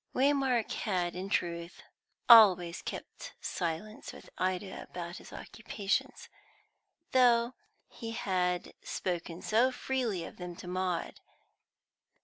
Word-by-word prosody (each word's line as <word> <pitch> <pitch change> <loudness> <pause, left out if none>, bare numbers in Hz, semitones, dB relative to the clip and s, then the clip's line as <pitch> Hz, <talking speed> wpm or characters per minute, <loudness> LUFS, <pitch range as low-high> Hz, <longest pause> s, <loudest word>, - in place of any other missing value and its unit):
Waymark 265 -4 +2
had 180 -5 -1
in 185 +2 -5
truth 170 -2 -2 0.4
always 185 -7 +8
kept - - -7
silence 175 +5 -4
with - - -13
Ida 185 +1 -2
about 175 0 -6
his - - -12
occupations, 230 +4 -3 0.8
though 240 -1 +4 0.3
he 230 - -8
had 180 -4 -1
spoken 175 -1 -4
so 235 +4 +3
freely 245 -8 -2
of - - -11
them 180 -1 -7
to 180 - -10
Maud. 180 -1 -2
190 Hz, 110 wpm, -31 LUFS, 180-235 Hz, 0.8 s, always